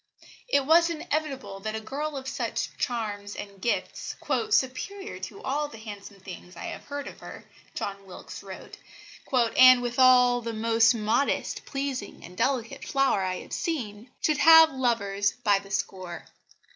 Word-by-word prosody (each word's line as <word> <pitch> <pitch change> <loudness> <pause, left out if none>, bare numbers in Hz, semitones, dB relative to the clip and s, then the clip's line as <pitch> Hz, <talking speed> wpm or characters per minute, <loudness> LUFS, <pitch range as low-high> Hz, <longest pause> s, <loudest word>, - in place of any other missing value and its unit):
It 280 - +2
was 335 +3 +5
inevitable 305 - -3
that 215 +2 -4
a - - -2
girl 285 +6 -4
of 265 -1 -7
such - - -3
charms 205 -4 -3
and 200 -2 -9
gifts 235 - -2 0.3
"superior 395 +5 -1
to 410 - -8
all 295 +3 -1
the 260 - -12
handsome 205 -2 -10
things 180 -1 -11
I 170 - -8
have - - -8
heard 285 0 -5
of - - -10
her," - - -10 0.3
John 195 -1 -5
Wilkes 185 - -10
wrote, 190 -1 -10 0.5
"and 255 0 +6
withal 245 0 +4
the 230 0 -4
most 225 +1 +3
modest, 220 +5 0
pleasing 275 -6 -4
and 180 - -12
delicate 255 +3 -1
flower 270 -7 +1
I 185 -1 -2
have - - -11
seen" 235 -8 -4
should 305 -1 +1
have 320 -1 +8
lovers 205 -6 0
by 205 -4 +4
the 195 0 -14
score. 185 -3 -4
240 Hz, 155 wpm, -27 LUFS, 205-275 Hz, 0.5 s, have